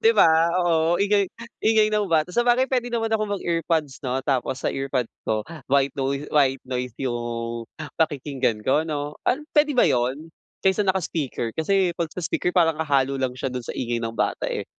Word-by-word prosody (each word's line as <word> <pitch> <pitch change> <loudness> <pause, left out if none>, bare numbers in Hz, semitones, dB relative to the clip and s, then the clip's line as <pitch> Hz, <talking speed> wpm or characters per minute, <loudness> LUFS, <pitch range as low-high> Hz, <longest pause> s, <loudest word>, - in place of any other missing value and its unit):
Di 455 0 +5
ba? 165 - +6 0.3
Oo, 165 -1 +2
ingay 200 -1 +3 0.3
ingay 220 -1 +4
ng 210 -2 +1
bata. 160 +1 +1
Sabagay, 240 +4 +3
pwede 250 -2 0
naman 225 -1 0
akong 215 -2 0
mag-earpods 165 -6 -1
'no? 130 +1 -1
Tapos 130 -1 -1
sa - - 0
earpods 135 -3 -2 0.2
ko, 110 -1 0 0.3
white 140 0 +3
noise 140 +1 -2
white 135 -3 +3
noise 125 -2 -3
yung 120 -2 -3 0.4
pakikinggan 140 -7 0
ko, 150 +4 +2
'no? 150 -1 -4
An 280 +4 +1
pwede 295 0 +5
ba 250 - +4
yun? 130 +6 0 0.3
Kaysa 195 +2 +2
naka 190 0 +2
speaker. 140 -8 -3
Kasi 185 +2 +2
'pag 165 -2 -3
sa 180 - -5
speaker 175 +2 -1
parang 165 -3 +3
hahalo 140 -3 +1
lang 130 -2 -1
siya 130 +1 -3
dun 125 -1 -5
sa - - -5
ingay 120 -2 -2
ng 115 0 -3
bata - - -1
eh. - - -3
150 Hz, 185 wpm, -24 LUFS, 130-190 Hz, 0.4 s, ba